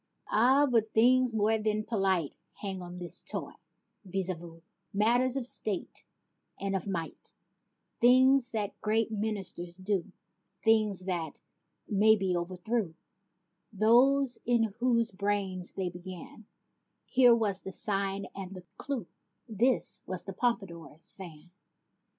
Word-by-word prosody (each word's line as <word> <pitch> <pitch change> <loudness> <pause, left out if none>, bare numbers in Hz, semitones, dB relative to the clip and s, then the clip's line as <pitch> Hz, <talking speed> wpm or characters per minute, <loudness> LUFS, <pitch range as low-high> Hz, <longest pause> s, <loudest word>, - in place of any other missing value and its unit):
Ah, 260 +6 +4
but 230 -5 0
things 250 +2 +5
more 220 0 +1
than 215 0 -1
polite 195 -8 0 0.2
Hung 195 -3 -5
on 175 0 -8
this 175 -1 +1
toy, - - -3 0.5
voyez 190 -1 -2
vents/ 165 0 -13 0.3
Matters 240 +5 +2
of 260 - -1
state 210 -5 -3 0.6
and 195 0 -2
of 190 - -3
might, 170 -4 -5 0.7
Things 255 +1 +5
that 210 -4 -4
great 220 +1 +1
ministers 200 -5 -3
do; 190 -1 -2 0.5
Things 215 -4 +2
that, 170 -5 -3 0.5
may 215 +2 +5
be, 190 -3 -1
overthrew 180 +2 -2 0.8
Those 245 +5 +3
in 230 -3 +1
whose 235 -2 +2
brains 195 -2 -2
they 185 -2 -2
began; 185 +4 -10 0.6
Here 250 -2 +5
was 205 -4 0
the 190 - -7
sign 195 -1 -2
and 195 -1 -7
the 180 - -9 0.2
cue, 265 -8 -3 0.4
This 235 +3 +1
was 185 -1 -3
the 195 - -7
Pompadour's 185 -9 -2
fan 175 -3 -11
205 Hz, 125 wpm, -30 LUFS, 185-230 Hz, 0.8 s, things